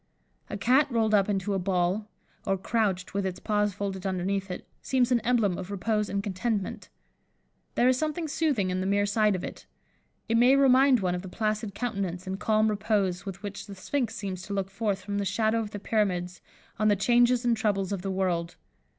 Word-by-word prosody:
A 205 - -4
cat 255 +8 +4
rolled 220 -2 +1
up 200 -1 +4
into 200 0 0
a 195 - 0
ball, 185 +2 0 0.4
or 195 - +2
crouched 190 -2 -1
with 200 0 0
its 185 -1 -3
paws 210 -1 +1
folded 195 -2 -4
underneath 195 +1 -1
it, 180 - -6 0.2
seems 255 -1 +1
an 245 - +4
emblem 220 -5 +1
of 185 0 -6
repose 210 +1 -1
and 200 0 -2
contentment. 205 +1 -3 0.9
There 245 - +4
is 255 0 +3
something 310 +1 -2
soothing 280 - 0
in 185 - -1
the 190 - -1
mere 205 +1 +2
sight 210 0 +2
of 185 - -4
it. - - -8 0.6
It 230 0 +2
may 250 +3 +6
remind 265 -2 +5
one 180 -2 0
of 180 - -3
the 190 - -8
placid 215 0 -2
countenance 200 -6 -3
and 190 +1 -4
calm 215 0 +2
repose 205 -3 0
with 195 +1 -7
which 205 -1 -6
the 200 - -8
sphynx 230 +3 -2
seems 195 -4 -4
to 200 - -4
look 195 -1 -2
forth 200 -1 -1
from 200 +1 -2
the - - 0
shadow 220 +4 +1
of 220 -2 -3
the 205 - -6
Pyramids, 185 -4 -1 0.4
on 215 - +3
the 205 - +5
changes 240 +4 +3
and 240 -1 +3
troubles 205 -3 0
of 195 -3 -2
the 195 - -3
world. 180 -3 -1
205 Hz, 205 wpm, -27 LUFS, 190-225 Hz, 0.9 s, may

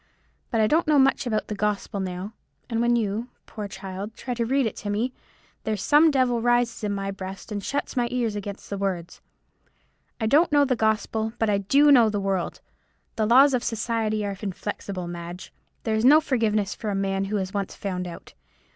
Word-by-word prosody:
But 230 - 0
I - - +5
don't 315 +9 +2
know 305 -1 +4
much 270 -1 +3
about 215 -2 -1
the - - -3
gospel 205 -1 -2
now; 185 +2 -4 0.4
and 230 0 +1
when 240 0 +3
you, 220 +1 -1 0.2
poor 210 -2 -6
child, 195 +2 -7
try 250 - -4
to 235 -1 -1
read 270 +1 +2
it 220 - -2
to 205 - -5
me, 225 +5 -1 0.5
there's 215 -3 -2
some 305 +2 +6
devil 255 -5 +2
rises 240 -1 +1
in 210 - 0
my 195 0 -2
breast, 195 +2 -8
and 205 -1 -3
shuts 285 +6 -3
my 245 -1 +1
ears 235 -4 -1
against 205 0 -7
the 200 - -3
words. 180 -3 -3 1.0
I 220 - -1
don't 295 +10 +4
know 290 -1 +5
the 255 -2 +1
gospel, 220 0 0
but 225 -2 +1
I 200 - +2
do 280 +9 +4
know 240 -5 +7
the 205 -1 -1
world. 195 -3 -2 0.5
The 215 -1 +1
laws 265 +4 +6
of 250 -1 +1
society 220 -2 -1
are 200 -1 -3
inflexible, 195 -2 -5
Madge; 175 +1 -8 0.3
there 220 - -1
is 220 +1 +1
no 290 +5 +8
forgiveness 215 -8 0
for 215 - -5
a 200 - -1
man 195 0 0
who 210 +2 -1
is 190 0 -3
once 200 -2 -3
found 180 -2 -4
out. 170 - -10
215 Hz, 205 wpm, -25 LUFS, 195-240 Hz, 1.0 s, no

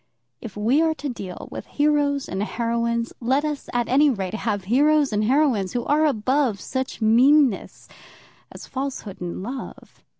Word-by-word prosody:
If 210 -3 -9
we 235 +9 +2
are 320 -1 +1
to 295 -2 -5
deal 195 -7 -7
with - - -7
heroes 290 -1 +2
and 190 - -3
heroines, 235 +1 -1
let 265 +5 +1
us, 300 -2 -4
at 240 -1 0
any 290 +3 +4
rate, 195 -7 -3
have 210 -2 -2
heroes 285 +5 +3
and 210 0 +1
heroines 250 -7 +2
who 240 -1 -2
are 310 +1 +3
above 255 -2 0
such 260 -1 -4
meanness 250 +1 +3 0.6
as - - -10
falsehood 260 -8 -5
in 175 +1 -5
love. 255 +5 -8
250 Hz, 160 wpm, -23 LUFS, 215-285 Hz, 0.6 s, any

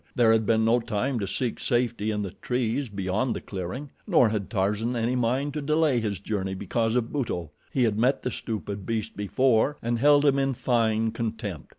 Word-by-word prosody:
There 115 -2 +5
had 110 -2 +2
been 110 -1 +3
no 115 +2 +4
time 120 +3 -1
to 100 - -2
seek 115 +4 -2
safety 120 -3 0
in 105 -1 -1
the 95 - -5
trees 125 +4 -2
beyond 100 +4 -1
the - - -3
clearing, 100 +10 -6 0.2
nor 160 - +5
had 105 -3 -3
Tarzan 105 +3 0
any 120 +2 0
mind 130 +4 0
to 150 - -3
delay 150 -3 +2
his 105 -4 -2
journey 95 -2 -3
because 115 +4 -1
of 120 -2 0
Buto. 90 - -2 0.2
He 130 - +2
had 110 -2 +1
met 130 +4 +2
the 125 - -1
stupid 105 -3 -5
beast 110 -1 -2
before 130 +6 +2
and 120 0 -1
held 145 +2 +5
him 140 -1 +4
in 135 -1 0
fine 115 -2 +1
contempt. 110 - -4
115 Hz, 200 wpm, -26 LUFS, 105-125 Hz, 0.2 s, There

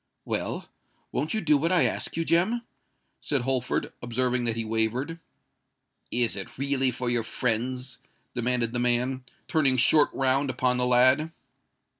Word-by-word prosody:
"Well—won't 150 +10 -4
you 215 - 0
do 150 -5 +3
what 165 +4 0
I 180 -2 +4
ask - - -2
you, 165 - 0
Jem?" 205 +10 +2 0.6
said 140 -4 -1
Holford, 125 0 -1
observing 125 +1 0
that 115 -1 0
he 115 -1 -3
wavered. 115 +9 -1 0.9
"Is 120 -2 0
it 115 +4 -8
really 135 -1 +1
for 125 0 -4
your 120 -1 +1
friends?" 125 +2 -2 0.3
demanded 120 -1 0
the 120 - 0
man, 125 +2 +1 0.2
turning 140 -5 +2
short 145 +4 +4
round 135 +1 +1
upon 125 0 +1
the 125 0 +3
lad. 130 +6 +4
125 Hz, 145 wpm, -26 LUFS, 120-140 Hz, 0.9 s, I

